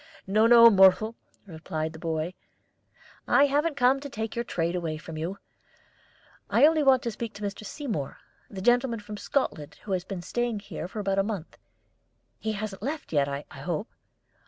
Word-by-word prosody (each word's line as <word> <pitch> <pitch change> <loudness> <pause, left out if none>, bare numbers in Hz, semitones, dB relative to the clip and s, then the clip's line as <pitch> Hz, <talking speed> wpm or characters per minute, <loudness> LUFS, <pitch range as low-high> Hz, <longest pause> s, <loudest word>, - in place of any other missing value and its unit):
"No, 215 +4 +3
no, 235 0 +9
Mohrle," 195 +3 +5 0.3
replied 160 -3 -5
the 160 - -10
boy; 165 +1 -2 0.9
"I 280 - +5
haven't 290 +2 0
come 255 +1 +4
to 285 +1 -7
take 220 -3 -5
your 235 - -1
trade 170 -6 -2
away 165 -3 -2
from 160 0 -9
you; 170 +5 -4 1.1
I - - +5
only 315 0 +4
want 270 -2 +4
to 235 - -2
speak 225 0 -6
to 205 - -8
Mr. 205 +1 -4
Seymour, 215 - -4 0.3
the 190 -2 -7
gentleman 245 0 +2
from 210 0 -8
Scotland 180 - -2
who 205 - -7
has 185 -2 0
been 185 -2 -6
staying 240 0 -2
here 200 - -6
for 210 - -7
about 195 -1 0
a - - +3
month. 200 -6 -5 0.8
He 220 0 -2
hasn't 205 -2 -5
left 285 - -5
yet, 140 -2 +3
I 140 +1 -4
hope?" 160 - -4
205 Hz, 180 wpm, -27 LUFS, 170-240 Hz, 1.1 s, no